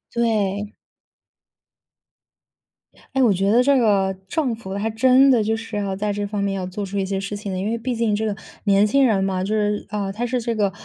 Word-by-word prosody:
对。 210 Hz, -3 st, 0 dB, 2.4 s
诶， 265 Hz, -, +3 dB
我 235 Hz, -5 st, +5 dB
觉 195 Hz, +2 st, +1 dB
得 240 Hz, +3 st, +5 dB
这 280 Hz, +1 st, +4 dB
个 200 Hz, -5 st, +2 dB
政 265 Hz, -8 st, 0 dB
府 190 Hz, -4 st, -8 dB
还 205 Hz, +3 st, -2 dB
真 255 Hz, +4 st, +5 dB
的 240 Hz, -5 st, +4 dB
就 220 Hz, -, 0 dB
是 225 Hz, -2 st, -5 dB
哈， 195 Hz, -, -2 dB
在 205 Hz, +1 st, -2 dB
这 205 Hz, 0 st, -2 dB
方 205 Hz, 0 st, -3 dB
面 200 Hz, 0 st, 0 dB
要 190 Hz, -1 st, -3 dB
做 195 Hz, +3 st, -5 dB
出 200 Hz, +1 st, -5 dB
一 195 Hz, -, 0 dB
些 195 Hz, 0 st, -2 dB
事 200 Hz, +1 st, -4 dB
情 205 Hz, -1 st, -6 dB
的， 185 Hz, -, -3 dB
因 200 Hz, +3 st, -2 dB
为 230 Hz, -, -1 dB
毕 245 Hz, +2 st, -3 dB
竟 225 Hz, -2 st, 0 dB
这 220 Hz, +1 st, -1 dB
个 215 Hz, -, -1 dB, 0.3 s
年 200 Hz, 0 st, +4 dB
轻 275 Hz, +4 st, +3 dB
人 210 Hz, -5 st, +2 dB
嘛， 190 Hz, -1 st, -1 dB
就 205 Hz, -, -2 dB
是 210 Hz, -1 st, 0 dB
呃， 205 Hz, -2 st, -3 dB
他 235 Hz, +4 st, -2 dB
是 250 Hz, +1 st, -1 dB
这 230 Hz, 0 st, -2 dB
个 205 Hz, -2 st, +1 dB
210 Hz, 245 characters per minute, -22 LUFS, 195-230 Hz, 2.4 s, 我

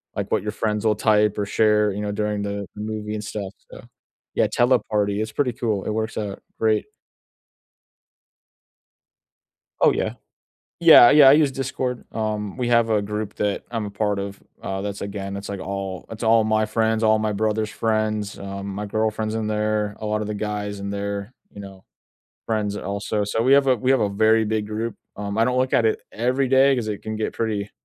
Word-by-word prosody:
like, -, -, -4 dB
what -, -, +2 dB
your 105 Hz, -, -2 dB
friends'll 105 Hz, 0 st, 0 dB
type 105 Hz, -1 st, +2 dB
or 100 Hz, -, 0 dB
share, 105 Hz, 0 st, +3 dB
you 100 Hz, -, -5 dB
know, 105 Hz, -, -2 dB
during 105 Hz, 0 st, -1 dB
the 100 Hz, 0 st, -3 dB
movie 105 Hz, 0 st, -4 dB
and 105 Hz, -, -5 dB
stuff, 100 Hz, -2 st, -5 dB, 0.2 s
so -, -, -10 dB, 0.5 s
Yeah, -, -, +3 dB
Teleparty, 105 Hz, -5 st, +1 dB
it's 110 Hz, 0 st, -4 dB
pretty 135 Hz, -4 st, +1 dB
cool. 110 Hz, -6 st, -2 dB
It -, -, -2 dB
works 110 Hz, +1 st, -2 dB
out 105 Hz, -2 st, -4 dB, 0.2 s
great 110 Hz, -1 st, +2 dB, 3.0 s
Oh, -, -, +6 dB
yeah. -, -, -1 dB, 0.7 s
Yeah, 160 Hz, -8 st, +9 dB
yeah, 145 Hz, -2 st, +8 dB
I -, -, +9 dB
use 150 Hz, -1 st, +4 dB
Discord. 130 Hz, -2 st, -3 dB
Um, 105 Hz, -1 st, -3 dB
we 125 Hz, -1 st, -1 dB
have 115 Hz, -1 st, +3 dB
a 105 Hz, -, +3 dB
group 105 Hz, 0 st, -4 dB
that 105 Hz, -1 st, -1 dB
I'm 115 Hz, -3 st, -3 dB
a 100 Hz, -, -6 dB
part 105 Hz, 0 st, -1 dB
of, 100 Hz, 0 st, -6 dB, 0.2 s
uh, 95 Hz, 0 st, -3 dB
that's, 100 Hz, 0 st, -4 dB
again, 100 Hz, -1 st, -5 dB
it's, 100 Hz, -, -7 dB
like, 100 Hz, -1 st, -5 dB
all 95 Hz, -1 st, -5 dB
it's 115 Hz, +1 st, -8 dB
all 115 Hz, -1 st, +4 dB
my 110 Hz, 0 st, +2 dB
friends, 110 Hz, +1 st, 0 dB
all 110 Hz, 0 st, +4 dB
my 110 Hz, 0 st, -1 dB
brother's 110 Hz, +1 st, -1 dB
friends, 110 Hz, -2 st, -1 dB
um, 100 Hz, 0 st, -6 dB
my 105 Hz, +1 st, -4 dB
girlfriend's 110 Hz, +1 st, -1 dB
in 110 Hz, -1 st, -2 dB
there, 105 Hz, -1 st, -1 dB
a 110 Hz, -, -6 dB
lot 105 Hz, 0 st, 0 dB
of 105 Hz, -, -3 dB
the 105 Hz, -, -3 dB
guys 105 Hz, -1 st, -4 dB
in 100 Hz, 0 st, -4 dB
there, 100 Hz, +2 st, -4 dB, 0.2 s
you 100 Hz, -, -9 dB
know, 95 Hz, -1 st, -11 dB, 0.6 s
friends 105 Hz, -2 st, -1 dB
also. 100 Hz, +1 st, -2 dB
So, 110 Hz, +3 st, -1 dB
we 130 Hz, +3 st, +4 dB
have 140 Hz, 0 st, +5 dB
a 130 Hz, -, +4 dB
we 125 Hz, +4 st, 0 dB
have 135 Hz, -, +4 dB
a 105 Hz, -, +2 dB
very 110 Hz, +2 st, +3 dB
big 110 Hz, -1 st, -1 dB
group. 110 Hz, +2 st, -3 dB, 0.2 s
Um, 100 Hz, +1 st, -4 dB
I 115 Hz, -, +5 dB
don't 125 Hz, +1 st, +1 dB
look 130 Hz, 0 st, 0 dB
at 115 Hz, -, +3 dB
it 110 Hz, -, +1 dB
every 125 Hz, +4 st, 0 dB
day, 135 Hz, +1 st, +5 dB
'cause 120 Hz, -4 st, -2 dB
it 105 Hz, -2 st, -4 dB
can 110 Hz, 0 st, -4 dB
get 110 Hz, -, -2 dB
pretty 105 Hz, -3 st, -2 dB
105 Hz, 205 wpm, -23 LUFS, 100-110 Hz, 3.0 s, Yeah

